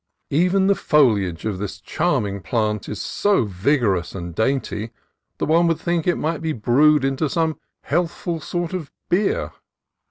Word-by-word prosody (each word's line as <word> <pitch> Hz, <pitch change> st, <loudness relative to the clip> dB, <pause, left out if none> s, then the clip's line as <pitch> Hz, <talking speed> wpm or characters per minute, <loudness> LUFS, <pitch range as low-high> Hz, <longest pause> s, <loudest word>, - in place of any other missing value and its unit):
Even 180 Hz, +6 st, +3 dB
the 200 Hz, -, +5 dB
foliage 105 Hz, -, +2 dB
of 105 Hz, -4 st, -2 dB
this 100 Hz, -1 st, -5 dB
charming 105 Hz, -, -1 dB
plant 105 Hz, +2 st, -1 dB
is -, -, -5 dB
so 205 Hz, -, +1 dB
vigor 105 Hz, +4 st, +1 dB
ous 90 Hz, 0 st, -4 dB
and 85 Hz, -2 st, -6 dB
dainty 110 Hz, 0 st, -1 dB, 0.5 s
that -, -, -1 dB
one 170 Hz, +2 st, +3 dB
would 165 Hz, -2 st, +1 dB
think 170 Hz, -2 st, -1 dB
it 175 Hz, -, +2 dB
might 160 Hz, +1 st, -2 dB
be 160 Hz, -1 st, -1 dB
brewed 135 Hz, +5 st, +3 dB
into 135 Hz, +2 st, 0 dB
some 160 Hz, -1 st, 0 dB, 0.2 s
healthful 170 Hz, +1 st, -1 dB
sort 175 Hz, +3 st, -3 dB
of 165 Hz, -6 st, -5 dB, 0.2 s
beer. 215 Hz, -, +1 dB
145 Hz, 160 wpm, -22 LUFS, 105-170 Hz, 0.5 s, the